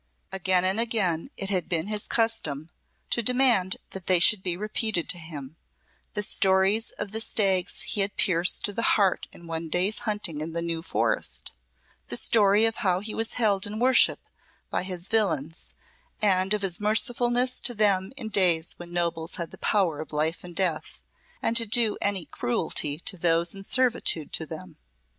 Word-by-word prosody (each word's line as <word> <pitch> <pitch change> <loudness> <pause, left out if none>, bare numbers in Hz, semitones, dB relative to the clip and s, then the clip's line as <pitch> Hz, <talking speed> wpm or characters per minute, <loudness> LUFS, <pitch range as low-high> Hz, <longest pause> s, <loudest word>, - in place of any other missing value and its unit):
Again 185 -1 +1
and 190 +4 +1
again 215 -5 0
it 195 0 -3
had 185 -3 -1
been 165 -2 -1
his 210 0 -3
custom 165 -10 -1 0.4
to 235 - +2
demand 240 -6 +3
that 190 -2 -8
they 185 - +5
should 195 +3 +4
be 180 -2 -2
repeated 215 -3 -1
to 175 - +1
him 155 -2 -9 0.6
the 210 - +1
stories 195 +2 +2
of 205 -1 -5
the 220 +1 -2
stags 195 -5 +1
he 205 - -1
had 195 +1 -2
pierced 175 -2 +1
to 205 - 0
the 230 - -2 0.2
heart 195 -3 +1
in 170 - -15
one 165 0 -5
day's 185 +6 +1
hunting 205 -8 -3
in 160 +1 -5
the 170 - -2
New 165 -1 -3
Forest - - -1 0.5
the 120 - -2
story 210 - +4
of 225 0 -1
how 185 -2 +1
he 215 +2 -6
was 225 0 -2
held 205 -5 +1
in 210 +1 -6
worship 255 +2 +4 0.5
by - - 0
his 180 -1 -4
villeins, 165 -8 -1 0.4
and 195 -1 +2
of 205 - -4
his 180 -3 0
mercifulness 240 +4 +1
to 245 - 0
them 200 -2 +2
in 225 -5 -5
days 175 -5 +2
when 175 0 -10
nobles 170 -1 -2
had 170 -2 -4
the - - -13
power 185 -8 +1
of 155 - -7
life 155 +3 -1
and 175 -1 -10
death, 175 -4 -2 0.4
and 230 - 0
to 230 -2 0
do 225 -1 +3
any 195 -4 0
cruelty 145 +4 -2
to 185 +3 -2
those 170 0 +2
in 195 - -8
servitude 225 - +1
to 160 - -2
them. 165 +1 -9
190 Hz, 180 wpm, -26 LUFS, 170-215 Hz, 0.6 s, they